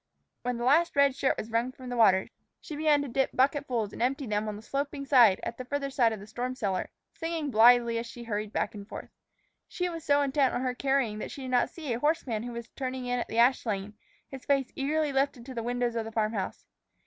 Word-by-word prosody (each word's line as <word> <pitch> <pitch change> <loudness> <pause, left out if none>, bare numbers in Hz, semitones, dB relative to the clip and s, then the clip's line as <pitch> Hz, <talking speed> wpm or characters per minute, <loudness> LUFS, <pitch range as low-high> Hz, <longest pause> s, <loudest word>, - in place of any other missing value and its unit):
When 245 0 -2
the 240 - -4
last 310 +7 +3
red 280 -2 +4
shirt 265 - +1
was 220 - -6
wrung 235 +3 0
from 255 -1 -10
the 245 - -3
water, 195 -5 +4 0.3
she 305 - -8
began 295 -1 +3
to - - -5
dip 270 +2 0
bucketfuls 255 -5 +1
and - - -7
empty 270 +3 0
them 210 -1 -1
on 210 - -3
the 210 - -10
sloping 280 +2 -3
ground 245 -8 +6
at 235 - -5
the - - -3
farther 275 +1 -3
side 240 -4 +3
of 220 - -5
the 200 - -10
storm 245 +4 -4
cellar, 195 -6 -2 0.2
singing 325 -3 -3
blithely 235 +1 +5
as 235 - -5
she 235 +1 -9
hurried 210 -2 -3
back - - -1
and 205 -1 -10
forth. - - -8 0.6
She 360 0 -2
was 330 -2 -6
so 285 -2 +3
intent 275 -1 +2
on - - -1
her 255 -1 -1
carrying 265 -5 0
that - - -5
she 275 - -8
did 255 - -5
not 245 -1 +3
see 305 -7 -5
a 230 - -3
horseman 285 -7 0
who 240 +1 -5
was 235 -1 -6
turning 260 -1 -4
in 245 0 -1
at - - -3
the 225 - -5
ash 245 +2 +4
lane, 205 -2 -3 0.3
his 270 -1 -9
face 275 -2 +1
eagerly 295 +1 0
lifted 270 -3 0
to 260 - -8
the 235 - -3
windows 245 0 -1
of 230 -1 -2
the 225 - -7
farm 220 0 0
house. 195 -4 -4
250 Hz, 250 wpm, -29 LUFS, 230-275 Hz, 0.6 s, ground